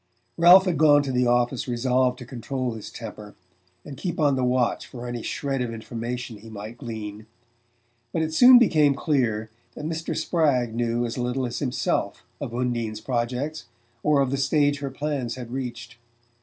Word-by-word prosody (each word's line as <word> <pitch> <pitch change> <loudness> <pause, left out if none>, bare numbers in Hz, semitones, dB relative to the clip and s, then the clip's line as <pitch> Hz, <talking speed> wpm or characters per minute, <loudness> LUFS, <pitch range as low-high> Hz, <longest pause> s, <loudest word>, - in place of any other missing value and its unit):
Ralph 180 +3 +8
had 180 -5 0
gone 145 -2 +6
to 135 - -3
the 125 -1 +2
office 120 +1 +1
resolved 125 +1 +1
to 125 - -9
control 130 0 -4
his 110 -2 -8
temper 105 -2 -9 0.5
and 145 - -8
keep 175 +4 -4
on 145 -3 +3
the 130 - -1
watch 125 -1 +1
for 120 -1 -8
any 120 -1 -4
shred 135 +1 -2
of 120 -2 -2
information 115 +1 -5
he 110 +2 -13
might 110 +2 -8
glean; 110 -3 -7 0.8
but 160 - 0
it 160 0 -3
soon 250 +7 +9
became 155 - +4
clear 120 -7 0 0.2
that 150 - -6
Mr. 160 +1 -3
Spragg 135 -9 +1
knew 120 0 0
as 120 +2 -4
little 125 +2 -1
as 120 -1 -4
himself 130 -3 -1 0.2
of - - -5
Undine's 120 -3 -2
projects, 130 +6 -3 0.4
or 150 -2 +3
of 135 -2 0
the 140 - 0
stage 145 +1 +2
her 140 -1 -3
plans 135 -3 -3
had 120 -2 -8
reached. 120 -2 -6
125 Hz, 175 wpm, -25 LUFS, 120-145 Hz, 0.8 s, soon